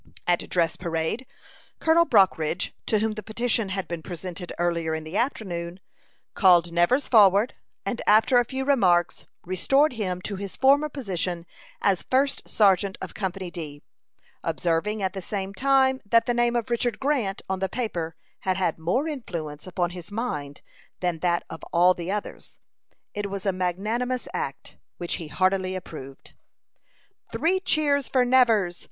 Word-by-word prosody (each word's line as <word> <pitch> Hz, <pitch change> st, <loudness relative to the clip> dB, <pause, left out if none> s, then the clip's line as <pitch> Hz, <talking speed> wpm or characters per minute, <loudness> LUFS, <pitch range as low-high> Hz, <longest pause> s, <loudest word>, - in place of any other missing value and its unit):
At 175 Hz, -1 st, 0 dB
dress 170 Hz, -2 st, +1 dB
parade, 170 Hz, +8 st, -2 dB, 0.5 s
Colonel 330 Hz, +1 st, +4 dB
Brockridge, 185 Hz, -5 st, +2 dB
to 215 Hz, -, +3 dB
whom 220 Hz, +1 st, +1 dB
the 215 Hz, -, -6 dB
petition 225 Hz, -1 st, 0 dB
had 190 Hz, 0 st, -3 dB
been 170 Hz, -1 st, -5 dB
presented 175 Hz, 0 st, -7 dB
early 170 Hz, -1 st, 0 dB
in 160 Hz, 0 st, -2 dB
the 155 Hz, +4 st, -8 dB
afternoon, 185 Hz, -8 st, -2 dB, 0.5 s
called 175 Hz, -3 st, +5 dB
Nevers 175 Hz, +12 st, +3 dB
forward, 205 Hz, 0 st, +5 dB, 0.3 s
and 240 Hz, -, -2 dB
after 225 Hz, +4 st, +5 dB
a -, -, +3 dB
few 265 Hz, +3 st, -4 dB
remarks, 185 Hz, -11 st, +2 dB, 0.2 s
restored 270 Hz, -, +2 dB
him 185 Hz, -6 st, -2 dB
to 200 Hz, -, -4 dB
his 195 Hz, 0 st, -6 dB
former 280 Hz, +3 st, +4 dB
position 185 Hz, -, -3 dB, 0.4 s
as 195 Hz, -3 st, +3 dB
first 275 Hz, +2 st, 0 dB
sergeant 195 Hz, -2 st, +3 dB
of -, -, -7 dB
Company 190 Hz, -2 st, -4 dB
D, 150 Hz, -4 st, -7 dB, 0.6 s
observing 195 Hz, +5 st, -1 dB
at 190 Hz, -1 st, -1 dB
the 190 Hz, -, -5 dB
same 195 Hz, +1 st, -4 dB
time 265 Hz, +2 st, +3 dB
that 230 Hz, +2 st, +3 dB
the 245 Hz, -, +1 dB
name 240 Hz, 0 st, +2 dB
of 235 Hz, 0 st, -1 dB
Richard 240 Hz, 0 st, 0 dB
Grant 260 Hz, -9 st, 0 dB
on 190 Hz, 0 st, -2 dB
the 190 Hz, 0 st, -1 dB
paper 175 Hz, -9 st, -3 dB, 0.2 s
had 185 Hz, -1 st, -1 dB
had 175 Hz, -4 st, 0 dB
more 210 Hz, -, 0 dB
influence 170 Hz, -, -6 dB
upon 175 Hz, -1 st, -1 dB
his 180 Hz, +1 st, -9 dB
mind 150 Hz, -, -4 dB, 0.4 s
than 175 Hz, -3 st, -1 dB
that 175 Hz, 0 st, +1 dB
of 165 Hz, -, -9 dB
all 175 Hz, +2 st, +5 dB
the 175 Hz, 0 st, -6 dB
others. 210 Hz, 0 st, -6 dB, 0.6 s
It 205 Hz, -1 st, -3 dB
was 195 Hz, 0 st, -5 dB
a 195 Hz, -, +2 dB
magnanimous 215 Hz, +8 st, -2 dB
act, -, -, -5 dB, 0.2 s
which 175 Hz, -, -2 dB
he 165 Hz, -, -7 dB
heartily 185 Hz, +3 st, +1 dB
approved. 135 Hz, -7 st, -9 dB, 1.0 s
"Three 370 Hz, +3 st, +1 dB
cheers 295 Hz, -6 st, +1 dB
for 255 Hz, -2 st, +3 dB
Nevers!" 225 Hz, -8 st, +3 dB
195 Hz, 160 wpm, -25 LUFS, 175-240 Hz, 1.0 s, called